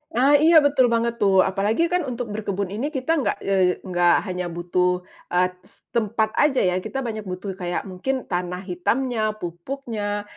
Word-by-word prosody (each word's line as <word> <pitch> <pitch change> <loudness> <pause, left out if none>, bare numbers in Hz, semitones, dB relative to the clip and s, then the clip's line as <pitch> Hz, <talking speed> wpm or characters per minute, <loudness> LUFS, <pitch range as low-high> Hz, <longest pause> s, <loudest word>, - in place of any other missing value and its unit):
Ah, 275 +4 +5
iya, 315 0 +6
betul 275 -3 +4
banget 235 0 0
tuh. 195 -2 +5
Apalagi 200 - +1
kan 355 -5 0
untuk 240 -3 -4
berkebun 200 -2 -3
ini 230 +8 -2
kita 265 +4 -1
nggak, 275 - 0
eee, 190 -2 +2
nggak 175 -2 +3
hanya 180 -1 -3
butuh, 180 +1 0 0.2
eee, 180 +1 +1 0.2
s - - -20
tempat 220 -1 0
aja 290 -3 +3
ya. 180 0 +1
Kita 270 +8 -4
banyak 215 -4 -5
butuh 185 +2 -5
kayak 175 -1 -2
mungkin 225 +8 -3
tanah 180 0 -3
hitamnya, 215 +4 -1
pupuknya, 205 +3 -4
205 Hz, 170 wpm, -23 LUFS, 180-245 Hz, 0.2 s, iya